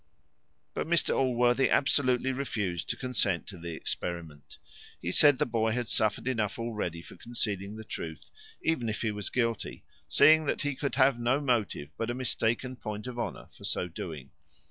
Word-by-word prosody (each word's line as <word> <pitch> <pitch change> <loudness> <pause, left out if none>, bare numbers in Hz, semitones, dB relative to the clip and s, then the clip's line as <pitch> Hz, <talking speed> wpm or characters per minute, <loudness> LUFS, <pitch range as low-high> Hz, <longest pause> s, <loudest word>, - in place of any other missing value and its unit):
But - - -2
Mr 170 0 +3
Allworthy 125 0 +3
absolutely 130 -2 +3
refused 105 -11 -2
to - - +2
consent 105 - 0
to 100 - -9
the 85 -1 -5
experiment. 80 -3 -5 0.4
He 85 - -2
said, 145 +6 +6
the - - +2
boy 115 -2 +1
had 120 -1 -1
suffered 110 +3 +1
enough 110 -6 0
already 105 -8 -3
for - - -12
concealing 105 -4 -3
the 110 - -7
truth, 80 -6 -7 0.3
even 125 -8 +1
if 110 - -3
he 110 - +1
was 105 -1 -3
guilty, 115 -4 -1 0.3
seeing 155 - +6
that - - 0
he 145 -1 0
could 140 0 -3
have 130 -2 +4
no 120 +4 +2
motive 115 - 0
but 115 - -1
a 120 - -1
mistaken 125 0 0
point 105 -1 -5
of 125 -1 -5
honour - - -4
for - - -16
so 90 - 0
doing. 80 -5 -7
115 Hz, 175 wpm, -30 LUFS, 100-130 Hz, 0.4 s, said